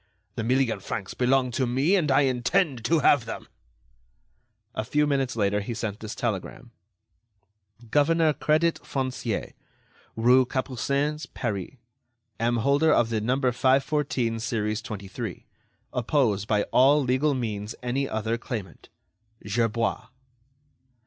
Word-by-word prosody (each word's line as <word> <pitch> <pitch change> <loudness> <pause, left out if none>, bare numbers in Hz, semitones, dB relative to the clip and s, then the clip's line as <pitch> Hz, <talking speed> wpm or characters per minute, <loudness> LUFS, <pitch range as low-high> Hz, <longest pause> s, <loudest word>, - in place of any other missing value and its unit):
The - - -4
million 125 -2 +1
francs 95 0 -5
belong 130 0 +2
to 130 +1 0
me, 135 +10 +2
and 165 -6 +1
I 135 +1 +5
intend 135 +1 +1
to 155 +6 +3
have 140 -4 +4
them." 115 - -7 1.3
A 110 - -2
few 150 +6 +1
minutes 135 -3 0
later, 105 -1 +1
he 115 +3 -5
sent 110 -2 -4
this 110 0 -6
telegram: 115 +2 -4 1.2
"Governor 155 +1 +3
Crédit 155 +3 +1
Foncier 130 -5 -3 0.6
"rue 125 +3 +5
Capucines, 140 +4 -1
Paris. 105 -1 -3 0.6
"Am 120 +1 +1
holder 145 +3 +4
of 115 -5 +3
No. 110 +3 +1 0.2
514, 130 -2 +1
series 110 -1 -2
23. 100 0 -6 0.5
Oppose 120 -5 +1
by 105 -1 +1
all 140 +3 +5
legal 130 +3 +1
means 110 -3 -4
any 135 +3 -1
other 110 +2 -2
claimant. 110 -5 -7 0.6
"GERBOIS." 115 +2 0
125 Hz, 120 wpm, -26 LUFS, 110-140 Hz, 1.3 s, I